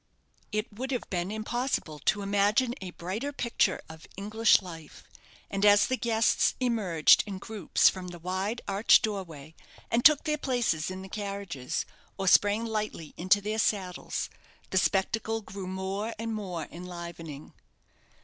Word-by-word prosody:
It 215 +1 -2
would 255 +5 -5
have 250 -3 -2
been 180 0 -1
impossible 220 - -2
to 200 +8 +1
imagine 205 +5 +2
a 185 - -5
brighter 190 +11 -4
picture 240 -4 0
of 160 0 -12
English 215 +3 +4
life; 165 -5 -11 0.4
and 195 0 -3
as 205 0 +7
the 260 - 0
guests 230 -3 +2
emerged 210 -11 +4
in 195 -2 -5
groups 205 -3 +1
from 185 -1 0
the 175 -1 -8
wide, 190 +6 -3
arched 200 +5 +5
doorway, 165 - -5 0.4
and 235 +1 +2
took 305 -2 +7
their 300 -1 -1
places 240 - 0
in 185 0 -6
the - - -8
carriages, 200 -9 -4 0.3
or 195 -1 -2
sprang 205 +4 +5
lightly 215 -8 -4
into 185 +4 +3
their 215 +2 -2
saddles, 190 -5 -1 0.4
the 190 - +4
spectacle 220 +4 0
grew 195 -2 -8
more 190 +4 -3
and 225 +1 -3
more 185 -7 -4
enlivening. 170 -4 -8
200 Hz, 150 wpm, -29 LUFS, 180-225 Hz, 0.4 s, as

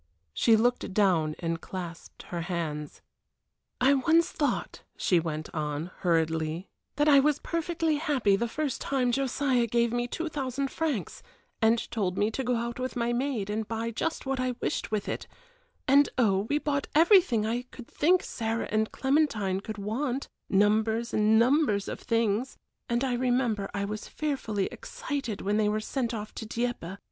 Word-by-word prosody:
She 225 - +4
looked 230 -3 +1
down 170 -7 +3
and 165 -1 -3
clasped 175 -3 -8
her 170 -1 -3
hands. 160 -4 -4 0.8
"I 260 +3 +5
once 325 +5 +3
thought," 290 - -2 0.2
she 180 - +3
went 155 -1 -4
on, 150 +2 -3
hurriedly, 160 0 0 0.3
"that 295 +1 +2
I 285 -2 +8
was 295 +1 +3
perfectly 330 -1 -1
happy 275 -10 +2
the 235 +4 -1
first 285 +2 -3
time 255 -3 +1
Josiah 265 -1 +1
gave 235 0 +1
me 240 0 0
two 330 +6 -3
thousand 275 -2 -2
francs, 300 - -2 0.4
and 225 +1 +5
told 195 -5 -1
me 210 +2 +2
to 265 - -3
go 250 0 +1
out 235 +1 -3
with 255 0 -3
my 240 0 0
maid 240 -5 -1
and 215 0 -2
buy 230 0 -2
just 325 +8 -2
what 265 -1 -1
I 255 -1 -1
wished - - -2
with 215 -2 -2
it; - - -4 0.6
and 280 +1 +6
oh, 205 -4 +2
we 290 - +2
bought 285 -2 -1
everything 320 - +5
I 235 +3 0
could 245 - -11
think 360 +4 +3
Sarah 225 0 -3
and 215 0 +1
Clementine 265 -10 +1
could 215 0 -6
want, 245 +6 -2 0.2
numbers 220 +3 +2
and 215 +1 +4
numbers 235 -4 +3
of - - -5
things, 230 +2 0 0.3
and 240 +2 +1
I 260 -2 0
remember 245 -5 0
I 200 -1 -2
was 210 +1 -5
fearfully 245 -10 -2
excited 285 - -5
when 205 +2 0
they 210 -1 +3
were 215 +1 0
sent 235 +2 -2
off 215 -2 -5
to 225 - -6
Dieppe. 230 -6 -3
230 Hz, 170 wpm, -28 LUFS, 205-270 Hz, 0.8 s, I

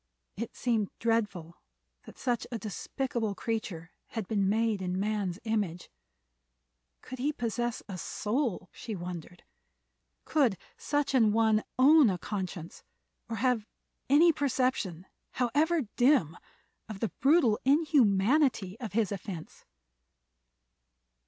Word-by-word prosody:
It 230 +3 -5
seemed 225 -5 0
dreadful 210 -8 -1 0.5
that - - -12
such 245 -2 -1
a 235 - -2
despicable 225 +1 -3
creature 190 -7 -4 0.2
had 220 -5 -5
been 200 -3 +1
made 220 -1 +1
in 180 0 -2
man's 200 -3 -1
image. 205 -6 -2 1.1
Could 255 - -8
he 285 +4 +1
possess 240 -3 -2
a 185 -3 -6
soul, 215 - -2
she 225 -3 -6
wondered? 175 -1 -7 0.8
Could 265 - +2 0.2
such 290 -1 -1
an 225 -5 +4
one 220 -1 +3
own 280 0 +7
a 185 - -1
conscience, 185 -4 -6 0.5
or 230 - -2
have 230 -1 +1 0.4
any 320 +4 +6
perception, 255 - -1 0.3
however 295 +6 +1
dim, 245 - +4 0.5
of 210 -3 -6
the 225 - -1
brutal 275 -7 +4
inhumanity 250 - +3
of 225 -4 -6
his 215 -2 +1
offense? 185 -4 -7
225 Hz, 115 wpm, -30 LUFS, 195-255 Hz, 1.1 s, own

